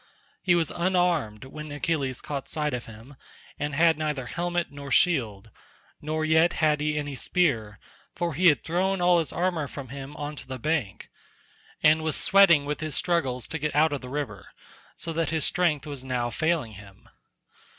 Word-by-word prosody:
He 180 -2 +3
was 165 -3 0
unarmed 175 - 0
when 150 +2 -8
Achilles 145 -4 -2
caught 140 -2 -5
sight 150 -2 -1
of 125 -1 -4
him, 115 +5 -13 0.4
and 145 0 -2
had 160 0 +4
neither 150 -4 -2
helmet 175 +3 -2
nor 140 -1 -8
shield; 115 - +1 0.5
nor 155 +1 -2
yet 160 +2 +4
had 150 -2 +2
he 150 0 0
any 145 -1 -3
spear, 125 - 0 0.4
for 170 -2 -2
he 180 +5 +3
had 150 -4 +4
thrown 190 +3 0
all 175 -1 +4
his 160 - -2
armour 170 -4 -1
from 140 -3 -8
him 140 +2 -8
on 145 +1 -5
to - - -5
the 130 0 -5
bank, 130 -7 -2 0.7
and 155 +1 +5
was 155 -1 0
sweating 195 -8 +5
with 150 +1 -3
his 155 -1 -4
struggles 145 -9 0
to 160 - -4
get 150 +1 -2
out 155 0 +4
of 140 - -3
the 125 - -8
river, 125 -10 -5 0.5
so 165 - -4
that 165 0 0
his 160 -2 0
strength 170 -7 +1
was 140 -3 -6
now 125 -2 -2
failing 155 -3 0
him. 100 -1 -14
150 Hz, 180 wpm, -26 LUFS, 135-165 Hz, 0.7 s, and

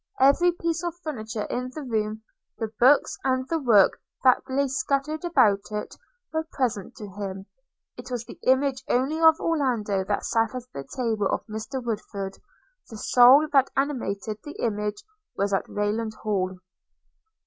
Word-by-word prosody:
Every 280 +7 +5
piece 335 -1 -2
of 345 -1 -3
furniture 220 -8 -4
in 250 +1 -3
the 305 - -5
room, 220 -3 -2 0.3
the 220 -2 -4
books, 265 +4 +4
and 260 0 0
the 330 - 0
work 225 -8 +4 0.2
that 255 -2 +5
lay 275 +2 +1
scattered 275 +4 -1
about 220 - +2
it, 210 0 -4 0.4
were 320 0 -1
present 230 -8 -2
to 210 - -8
him. 195 -1 -6 0.5
It - - -9
was 245 -2 -4
the - - -12
image 260 0 +2
only 275 +6 +1
of 320 0 +6
Orlando 240 - 0
that 205 +1 -1
sat 225 0 +1
at 250 - -4
the 140 - -6
table 220 - -1
of - - -2
Mr 230 +4 -5
Woodford; 200 -3 -4 0.5
the 220 - -8
soul 255 +7 +6
that 270 -1 +5
animated 220 -7 -2
that 295 - -9
image 210 - -2 0.3
was 200 0 0
at 195 - 0
Rayland 215 +2 -2
Hall. 190 -3 -1
240 Hz, 160 wpm, -25 LUFS, 210-275 Hz, 0.5 s, of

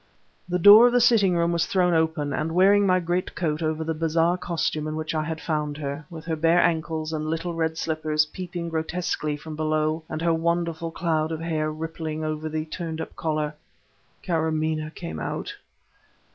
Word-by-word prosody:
The 180 - +1
door 205 +6 +9
of 245 - +1
the 245 - +5
sitting 225 -7 +4
room 170 0 +2
was 170 0 +1
thrown 180 -2 +2
open, 160 -3 0
and, 160 +3 -2
wearing 200 +3 +5
my 185 0 +4
great 175 +1 -2
coat 155 -3 -1
over 160 0 -1
the 160 0 -2
bizarre 165 +2 +1
costume 165 -3 -2
in 155 - -3
which 155 0 -3
I 155 - 0
had 160 +1 -4
found 150 -3 -2
her, 145 0 -5
with 160 -2 -9
her 165 -1 -1
bare 165 +2 +3
ankles 160 -1 0
and 155 0 -2
little 165 +2 -2
red 160 -1 -1
slippers 155 -1 0
peeping 175 0 -6
grotesquely 160 -2 -2
from 155 +1 -8
below, 155 +1 0
and 155 - -4
her 170 -1 +3
wonderful 165 0 -1
cloud 160 -1 -1
of 160 - -3
hair 155 -2 -1
rippling 160 0 -5
over 155 0 -3
the 155 0 -3
turned 160 0 -5
up 160 - -6
collar, 155 -1 -2 0.7
Kâramaneh 155 -2 -1
came 80 -1 -6
out! - - -4
160 Hz, 185 wpm, -25 LUFS, 155-170 Hz, 0.7 s, door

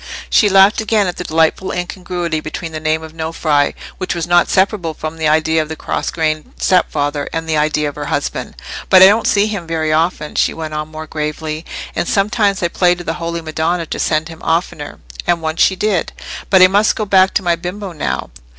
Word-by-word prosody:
She 210 - +5
laughed 195 +3 +5
again 215 -1 +2
at 180 -2 -3
the - - -4
delightful 160 +3 +1
incongruity 180 -2 -3
between 160 +2 -6
the 155 - -5
name 155 +1 0
of 160 0 -10
Nofri—which 160 +2 -1
was 170 -2 -2
not 175 0 +3
separable 185 -4 +1
from 155 +1 -6
the 160 -1 0
idea 160 +1 +2
of 155 - -5
the 160 - -4
cross - - -3
grained 155 -2 -2
stepfather—and 150 -2 0
the 160 - 0
idea 150 0 +1
of 145 - -4
her - - -6
husband. - - -3 0.3
"But 185 -1 +8
I - - +11
don't 210 +4 +4
see 205 0 +3
him 200 -6 -4
very 160 -1 0
often," 160 -1 0
she - - +1
went 160 -1 -6
on, 150 0 -3
more 155 0 -8
gravely. 155 +1 -4 0.3
"And - - -1
sometimes 200 -1 +1
I 170 - +1
pray 180 0 +2
to 175 - -8
the 165 - -2
Holy 170 0 -3
Madonna 165 +2 -1
to - - -5
send 155 0 0
him 165 -1 -11
oftener, 160 -3 -2 0.3
and 175 -1 +2
once 160 0 -2
she 190 - +4
did. 190 -2 -1 0.4
But 190 -2 +6
I - - +9
must 205 +3 +2
go 215 - -2
back 190 -1 +4
to 195 - +1
my 175 -1 +2
bimbo 185 +3 -6
now. 150 - -3
165 Hz, 210 wpm, -17 LUFS, 155-185 Hz, 0.4 s, I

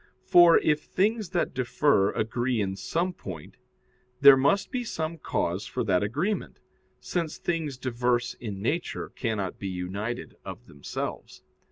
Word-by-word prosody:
For, 175 -1 +7
if 150 -1 +2
things 210 +3 0
that 175 - -1
differ 130 -4 +2
agree 120 +2 -1
in 95 -2 -1
some 175 - -1
point, 85 - -9 0.6
there 140 -1 +10
must 145 +9 +2
be 250 -2 -2
some 160 -6 -4
cause 90 -6 -2
for 125 - -2
that 95 -5 +2
agreement, 150 - -2 0.4
since 170 -3 -3
things 160 -6 -2
diverse 125 -1 0
in 100 -4 -7
nature 160 +9 -2
cannot 105 -6 -3
be 100 - -4
united 95 +6 -4
of - - -8
themselves. 70 -1 -6
130 Hz, 140 wpm, -27 LUFS, 105-165 Hz, 0.6 s, there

